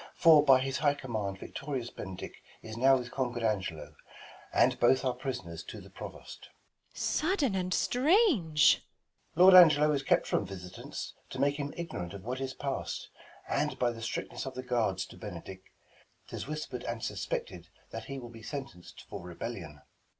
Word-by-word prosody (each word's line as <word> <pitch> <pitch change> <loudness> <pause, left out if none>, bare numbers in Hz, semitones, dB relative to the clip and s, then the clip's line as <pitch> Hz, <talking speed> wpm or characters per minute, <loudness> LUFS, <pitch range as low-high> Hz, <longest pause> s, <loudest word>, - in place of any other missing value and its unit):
For 160 -3 +7
by 135 -3 +6
his 135 +1 -2
high 145 -1 +3
command 110 -8 -4
victorious 135 +1 -5
Benedick 95 -2 -8 0.2
Is 110 0 -7
now 135 +3 +5
with 125 -1 -6
conquer'd 120 -3 -2
Angelo, 95 -7 -2 0.6
and - - +3
both 130 +2 +4
Are 130 - +2
pris'ners 90 - -5
to - - -7
the - - -14
Provost. - - -9 0.5
Beat. - - -19
Sudden 305 - +1
and 185 -1 -1
strange! 245 - +4 0.5
Balt. 180 +3 +8
Lord 185 - +13
Angelo 150 -2 +4
is 140 -2 +1
kept 135 - +2
from - - +1
visitants, 90 -2 -7 0.2
To - - -7
make 140 +1 +2
him 145 -1 -3
ignorant 95 - -5
of 95 - -9
what 130 +3 -4
is 135 0 -4
past; 140 -1 -4 0.4
And, - - 0
by 120 -1 +2
the 115 -1 -9
strictness 115 +3 -4
of 130 - -6
the 130 - -5
guards 110 -7 0
to - - -14
Benedick, 95 -1 -8 0.6
'Tis - - -6
whisper'd 150 -5 -5
and 115 -1 -4
suspected - - -4 0.2
that - - -6
he 135 - -6
will 120 -2 -8
Be 115 -1 -12
sentenc'd 135 - -8
for - - -7
rebellion. 85 -4 -7
130 Hz, 170 wpm, -31 LUFS, 110-150 Hz, 0.6 s, Lord